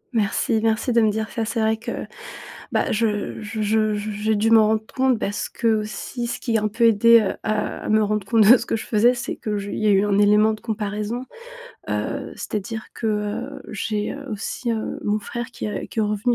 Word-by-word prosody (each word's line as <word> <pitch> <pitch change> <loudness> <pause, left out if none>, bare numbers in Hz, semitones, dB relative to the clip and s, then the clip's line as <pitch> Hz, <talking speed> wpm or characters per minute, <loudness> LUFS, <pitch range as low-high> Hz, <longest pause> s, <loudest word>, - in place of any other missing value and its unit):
Merci, 220 +1 +1
merci 225 +2 +1
de 235 - +4
me 220 - +4
dire 220 +1 -2
ça 225 - -2
c'est 230 +1 -2
vrai 220 0 +2
que, 235 +1 -5 0.7
bah, - - 0
je 215 -2 -1
je 215 0 -4
je 215 0 +2
je 210 +1 -3
j'ai 210 +1 0
dû 220 +2 +2
m'en 220 -1 +7
rendre 215 0 +1
compte 260 -3 +2
parce 205 0 -3
qu'aussi 225 +2 -2
ce 235 - -3
qui 230 -3 0
a 215 - -2
un 215 - +1
peu 230 +3 0
aidé, 230 +1 +6
heu, 195 - -2
à 215 0 -1
à - - -7
me 215 0 +4
rendre 210 -1 -1
compte 225 0 +4
de 245 +5 +9
ce 235 - -6
que - - 0
je 220 - -6
faisais 235 +3 +3
c'est 240 -1 -4
que 210 -1 -3
j 200 0 -4
il - - -3
y 215 - 0
a - - +5
eu 200 0 +4
un 200 -1 +1
élément 210 +1 +5
de 215 - -7
comparaison, 215 +2 -3 0.7
heu, - - -3
c'est-à-dire 220 +2 -4
que, 225 - -4
heu, 215 +6 -2
j'ai, 210 0 -2
heu, 275 - -9
aussi, 220 +3 -3
heu, 220 -1 -3
mon 210 +1 +1
frère 235 +3 -5
qui, - - -5
heu, - - -3
qui - - -7
est - - +4
revenu 210 +3 +1
215 Hz, 235 wpm, -22 LUFS, 210-230 Hz, 0.7 s, de